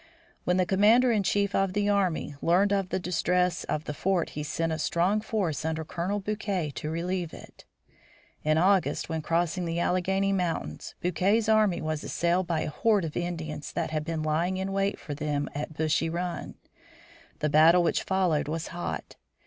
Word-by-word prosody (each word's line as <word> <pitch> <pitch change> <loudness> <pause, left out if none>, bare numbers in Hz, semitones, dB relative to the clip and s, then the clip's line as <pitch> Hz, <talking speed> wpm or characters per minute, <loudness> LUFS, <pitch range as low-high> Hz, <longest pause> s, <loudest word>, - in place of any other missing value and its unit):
When 180 +1 +2
the 185 - +3
commander 215 +7 +5
in 215 -3 +2
chief 200 +1 +1
of 195 -1 +1
the 205 0 +1
army 190 -7 +1
learned 190 +4 +3
of 195 -2 0
the - - 0
distress 180 0 0
of 155 - -2
the 150 - -4
fort 180 +2 0
he 150 - -5
sent 160 +2 -2
a 160 - -2
strong 180 +7 +1
force 190 -10 -2
under 160 0 -2
Colonel 180 +6 -2
Bouquet 200 -6 -2
to 150 - -4
relieve 170 +1 -2
it. - - -14 0.8
In 155 +1 +2
August, 190 +1 +2
when 160 -1 -2
crossing 170 +2 0
the 165 0 -2
Alleghany 190 +3 +1
Mountains, 165 - -3
Bouquet's 195 +6 +1
army 215 -6 +3
was 155 -1 -2
assailed 175 +1 0
by 165 -2 0
a - - -3
horde 205 +3 +2
of 155 - -6
Indians 160 -4 -4
that 165 -2 -2
had 155 -1 -1
been 160 -1 -3
lying 165 +4 0
in 190 +1 -2
wait 195 +1 0
for 150 - -7
them 145 -1 -2
at 150 +2 -5
Bushy 160 +1 +1
Run. 175 +1 -4 0.8
The 150 - 0
battle 165 +4 +6
which 170 - +1
followed 185 -7 +1
was 160 +2 -3
hot. 175 +1 -5
175 Hz, 180 wpm, -28 LUFS, 160-195 Hz, 0.8 s, battle